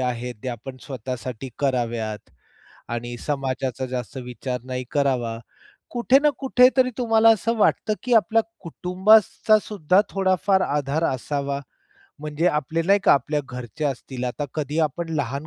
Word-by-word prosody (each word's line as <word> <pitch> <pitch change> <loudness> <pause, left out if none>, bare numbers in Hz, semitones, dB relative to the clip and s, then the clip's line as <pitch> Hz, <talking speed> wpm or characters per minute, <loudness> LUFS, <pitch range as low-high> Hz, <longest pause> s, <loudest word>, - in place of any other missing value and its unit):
आहेत 125 -1 -2
त्या 125 - -3
आपण 130 +3 -9
स्वतःसाठी 130 -1 -6
कराव्यात 120 -5 -2 0.7
आणि 120 +1 -5
समाजाचा 130 -3 -2
जास्त 125 -1 -5
विचार 125 0 -5
नाही 130 0 -4
करावा. 125 -5 0 0.5
कुठे 250 +2 +4
ना 300 - +5
कुठेतरी 255 -1 +4
तुम्हाला 225 -2 +4
असं 225 +2 +1
वाटतं, 215 0 +2
की 245 -1 +1
आपल्या 225 0 +4 0.2
कुटुंबाचा 200 +5 +3
सुद्धा 185 -2 +2
थोडाफार 190 0 +2
आधार 145 +2 -1
असावा, 140 +2 -3 0.6
म्हणजे 155 +3 -1
आपले 160 +1 0
नाही 200 +1 +5
का - - +7
आपल्या 145 +2 +1
घरचे 125 +4 -6
असतील. 130 -2 -3
आता 125 +4 -3
कधी 150 0 -2
आपण 165 +4 -6
लहान 140 +1 -2
145 Hz, 135 wpm, -23 LUFS, 125-190 Hz, 0.7 s, का